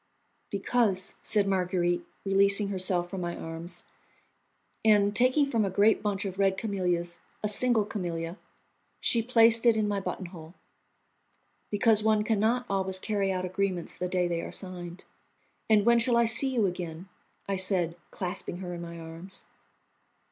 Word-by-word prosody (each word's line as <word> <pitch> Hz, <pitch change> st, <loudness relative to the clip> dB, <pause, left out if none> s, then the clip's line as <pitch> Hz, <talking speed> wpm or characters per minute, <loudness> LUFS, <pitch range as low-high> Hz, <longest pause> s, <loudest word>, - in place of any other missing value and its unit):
"Because," 200 Hz, -2 st, 0 dB
said 210 Hz, -2 st, +2 dB
Marguerite, 180 Hz, -2 st, 0 dB, 0.2 s
releasing 200 Hz, +1 st, +4 dB
herself 185 Hz, -2 st, 0 dB
from 190 Hz, -2 st, -4 dB
my 175 Hz, 0 st, -3 dB
arms, 165 Hz, +2 st, -5 dB, 1.0 s
and, 205 Hz, -2 st, +4 dB
taking 255 Hz, +5 st, +4 dB
from 230 Hz, -6 st, 0 dB
a 195 Hz, -, 0 dB
great 205 Hz, +4 st, +3 dB
bunch 200 Hz, -1 st, -2 dB
of 190 Hz, 0 st, -5 dB
red 195 Hz, -1 st, +2 dB
camellias 180 Hz, -5 st, -1 dB, 0.2 s
a -, -, +1 dB
single 220 Hz, 0 st, +3 dB
camellia, 175 Hz, -3 st, -4 dB, 0.6 s
she 230 Hz, -, +3 dB
placed 230 Hz, -1 st, +4 dB
it 235 Hz, -2 st, +4 dB
in 215 Hz, -1 st, +1 dB
my 205 Hz, -1 st, -1 dB
buttonhole, 175 Hz, -3 st, -7 dB, 1.1 s
"because 215 Hz, 0 st, +4 dB
one 215 Hz, -1 st, +2 dB
can 215 Hz, -1 st, 0 dB
not 240 Hz, +4 st, +1 dB
always 190 Hz, -1 st, 0 dB
carry 200 Hz, -1 st, -1 dB
out 185 Hz, -1 st, -2 dB
agreements 185 Hz, -1 st, -2 dB
the 180 Hz, -, -3 dB
day 180 Hz, -1 st, +1 dB
they 170 Hz, -1 st, -2 dB
are -, -, -7 dB
signed." 180 Hz, -2 st, -7 dB, 0.6 s
"And 210 Hz, -2 st, +4 dB
when 235 Hz, 0 st, +5 dB
shall 235 Hz, 0 st, +3 dB
I 235 Hz, -, +4 dB
see 230 Hz, +4 st, +2 dB
you 235 Hz, -5 st, +1 dB
again?" 175 Hz, -1 st, -5 dB, 0.4 s
I 195 Hz, -, -1 dB
said, 185 Hz, -3 st, +1 dB
clasping 180 Hz, -1 st, -3 dB
her 180 Hz, -1 st, -6 dB
in 170 Hz, -, -6 dB
my 170 Hz, 0 st, -8 dB
arms. 165 Hz, +4 st, -7 dB
195 Hz, 155 wpm, -28 LUFS, 180-215 Hz, 1.1 s, when